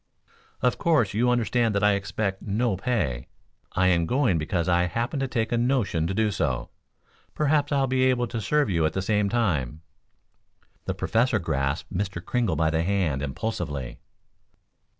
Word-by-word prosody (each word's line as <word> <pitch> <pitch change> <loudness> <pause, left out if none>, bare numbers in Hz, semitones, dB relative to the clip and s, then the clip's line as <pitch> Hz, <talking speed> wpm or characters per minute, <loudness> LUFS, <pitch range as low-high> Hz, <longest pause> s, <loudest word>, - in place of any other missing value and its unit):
"Of 125 - +1
course, 150 - +2
you 120 +4 +2
understand 120 -2 +1
that 100 - +1
I 105 - +5
expect 100 0 -2
no 110 +1 0
pay. 85 - -2 0.5
I 95 - +2
am 85 -2 +2
going 125 - +2
because 85 +2 -1
I 90 0 +3
happen 115 - -2
to 135 - -1
take 115 -3 -1
a 120 - +1
notion 120 -10 +1
to 95 - -2
do 110 0 +2
so. 65 -9 -2 0.6
Perhaps 150 -1 +1
I'll 140 -1 +2
be 130 0 +1
able 125 -1 +2
to 115 - -3
serve 145 +7 +1
you 85 -3 +1
at 80 - -4
the 95 - -1
same 105 0 +1
time." 80 - -1 1.0
The - - -2
Professor 115 +1 +1
grasped 70 -6 -2
Mr. 95 -1 -2
Kringle 110 -1 -1
by 80 +1 +1
the 80 0 +1
hand 85 -7 0
impulsively. 70 - -4
100 Hz, 170 wpm, -25 LUFS, 85-120 Hz, 1.0 s, I